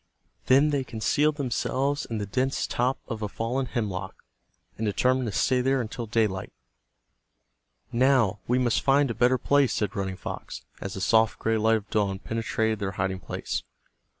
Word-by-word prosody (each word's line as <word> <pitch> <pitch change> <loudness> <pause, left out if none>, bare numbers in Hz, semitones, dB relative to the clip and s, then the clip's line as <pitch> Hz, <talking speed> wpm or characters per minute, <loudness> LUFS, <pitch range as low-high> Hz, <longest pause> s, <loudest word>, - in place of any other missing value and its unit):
Then 140 +4 +5
they 140 -2 0
concealed 145 +6 +1
themselves 140 +1 -1
in 115 - -3
the 105 - -2
dense 130 +7 0
top 125 +2 0
of 110 -1 -5
a 105 - -2
fallen 125 +5 -2
hemlock, 100 -5 -3 0.6
and 115 - -5
determined 125 +4 +1
to - - -2
stay 125 +5 +2
there 135 +1 +2
until 115 0 -4
daylight. 105 -4 0 1.4
"Now 120 -5 +3
we 125 - +2
must 125 -3 +2
find 140 -1 +3
a - - -2
better 125 +3 +3
place," 140 -1 +3
said 105 +1 -1
Running 95 -2 -3
Fox, - - -7 0.2
as 100 - -5
the 95 - -5
soft 110 +3 +3
gray 115 0 0
light 110 +1 +4
of 105 -1 -10
dawn 100 -3 +1
penetrated 110 0 -1
their 100 -1 -3
hiding 95 0 -2
place. - - -4
115 Hz, 170 wpm, -26 LUFS, 105-130 Hz, 1.4 s, Then